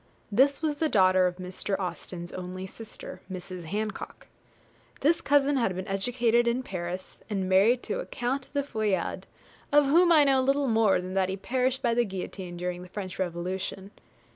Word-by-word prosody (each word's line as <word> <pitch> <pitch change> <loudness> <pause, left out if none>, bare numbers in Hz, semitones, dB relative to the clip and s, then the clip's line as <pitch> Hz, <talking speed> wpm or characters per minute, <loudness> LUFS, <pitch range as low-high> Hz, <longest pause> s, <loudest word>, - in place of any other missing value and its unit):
This 275 +8 +3
was 300 -2 0
the 315 +1 +1
daughter 185 -4 +5
of 180 - -3
Mr. 185 +2 -3
Austen's 175 -2 -5
only 185 +1 -5
sister, 220 +3 -10
Mrs. 185 -1 -7
Hancock. 210 +5 -4 0.8
This 325 +4 +3
cousin 285 0 +3
had 210 -7 +1
been 185 +1 -5
educated 235 +4 +1
in 240 +2 +1
Paris, 180 -3 -6
and 195 -3 -1
married 205 +7 +4
to 455 +3 -2
a - - -5
Count 260 +2 -3
de 285 -1 0
Feuillade, 215 -8 -2 0.4
of 295 0 +6
whom 340 +5 +5
I 310 -3 +7
know 270 -2 +4
little 275 +1 +2
more 220 -5 +3
than 185 +1 -6
that 190 -1 +1
he 190 - -2
perished 255 +5 0
by 235 -2 +3
the 240 +1 +3
guillotine 185 -3 -6
during 180 0 -3
the 180 - -11
French 185 -1 -6
Revolution. 185 +2 -3
205 Hz, 175 wpm, -28 LUFS, 185-260 Hz, 0.8 s, I